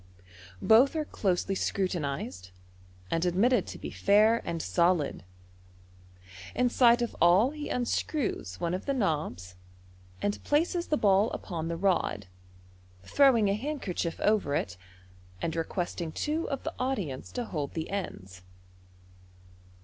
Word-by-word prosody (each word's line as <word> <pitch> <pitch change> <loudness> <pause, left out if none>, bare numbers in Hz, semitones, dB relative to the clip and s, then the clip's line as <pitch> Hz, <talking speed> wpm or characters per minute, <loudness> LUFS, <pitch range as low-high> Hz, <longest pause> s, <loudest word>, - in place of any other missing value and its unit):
Both 245 +7 +5
ar« 310 -1 -1
closely 195 -6 -1
scrutinized, 145 - -2 0.6
and 165 - +1
admitted 195 +5 +2
to - - -7
be - - -7
fair 215 +3 +4
and 165 - -3
solid. 165 - +1 1.3
In 250 0 +2
sight 240 -1 +4
of 235 - -4
all 185 +10 +5
he 300 -1 -6
unscrews 245 - -2
one 170 0 -1
of 185 - -4
the 275 - +1
knobs, 150 - -2 0.7
and 205 - -2
places 340 +4 +1
the 300 - +1
ball 200 -1 +3
upon 165 -3 -4
the 170 0 -3
red, 175 - 0 0.8
throwing 245 - +4
a 195 - +2
handkerchief 215 - -3
over 205 -9 +2
it, 90 -9 -2 0.6
and 160 - -2
requesting 170 0 -3
two 310 - -2
of 275 -2 -3
the - - -4
audience 200 - -3
to 245 -1 -3
hold 150 -8 -4
the 160 -1 -3
ends. 95 - -5
195 Hz, 130 wpm, -29 LUFS, 165-245 Hz, 1.3 s, Both